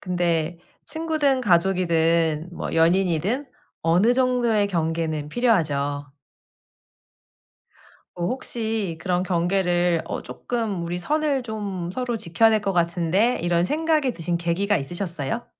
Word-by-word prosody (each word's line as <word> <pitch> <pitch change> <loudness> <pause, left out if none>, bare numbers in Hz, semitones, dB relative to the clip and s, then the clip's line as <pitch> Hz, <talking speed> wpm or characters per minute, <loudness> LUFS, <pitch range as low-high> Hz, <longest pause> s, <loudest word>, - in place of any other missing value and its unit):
근데 175 -2 -1 0.3
친구든 310 -5 0
가족이든 170 -3 +2
뭐 - - -5
연인이든 180 - +2 0.4
어느 180 +8 +4
정도의 245 -5 +2
경계는 160 -4 -1
필요하죠. 145 - 0 2.1
어 175 - -2
혹시 220 -6 -3
그런 180 +1 0
경계를 175 -1 +1
어 - - -4
쪼끔 220 -7 -3
'우리 170 +1 -3
선을 290 - 0
좀 200 -6 -4
서로 245 +2 -2
지켜야 205 +5 +3
될 215 -1 +2
것 195 -2 -1
같은데?' 175 +7 +1
이런 170 0 +2
생각이 300 - +1
드신 170 -1 -2
계기가 175 +5 0
있으셨어요? 170 - -3
180 Hz, 260 characters per minute, -23 LUFS, 170-225 Hz, 2.1 s, 어느